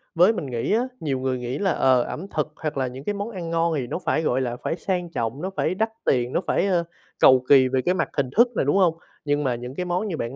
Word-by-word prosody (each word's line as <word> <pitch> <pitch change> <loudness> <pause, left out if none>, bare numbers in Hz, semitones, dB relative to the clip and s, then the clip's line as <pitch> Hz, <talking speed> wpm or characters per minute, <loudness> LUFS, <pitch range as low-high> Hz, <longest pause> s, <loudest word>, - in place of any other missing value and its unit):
với 180 +6 +5
mình 175 - -4
nghĩ 120 - -2
á, 245 +3 +1
nhiều 135 -4 -2
người 130 -1 -1
nghĩ 125 +2 -4
là, 195 -2 +1
ờ, 130 -5 +3
ẩm 180 +9 -6
thực 155 -1 0
hoặc 155 -3 -4
là 130 -1 0
những 130 +2 -8
cái 205 - -1
món 205 +2 -4
ăn 180 -5 -6
ngon 165 0 +1
thì 125 -3 -3
nó - - -3
phải, 160 - +1
gọi 130 -4 +1
là, 120 -2 -2
phải - - -1
sang 180 -1 -2
trọng, 115 +3 -3
nó 185 - -2
phải - - 0
đắt 220 +3 0 0.2
tiền, 125 -1 +1
nó - - +1
phải, 195 - +1
ơ, 175 -3 +2 0.4
cầu 130 -1 +6
kỳ 135 -2 +7
về 130 0 0
cái 180 - +1
mặt 185 - -1
hình 135 -3 +1
thức 240 +2 +7
này, - - +1
đúng 145 - +2
hông? 170 -4 +3 0.3
Nhưng 145 0 +1
mà 130 -3 0
những 125 +2 -7
cái 180 - -3
món 180 +4 -1
như 175 -6 -3
bạn 120 0 -4
150 Hz, 290 wpm, -24 LUFS, 130-180 Hz, 0.4 s, kỳ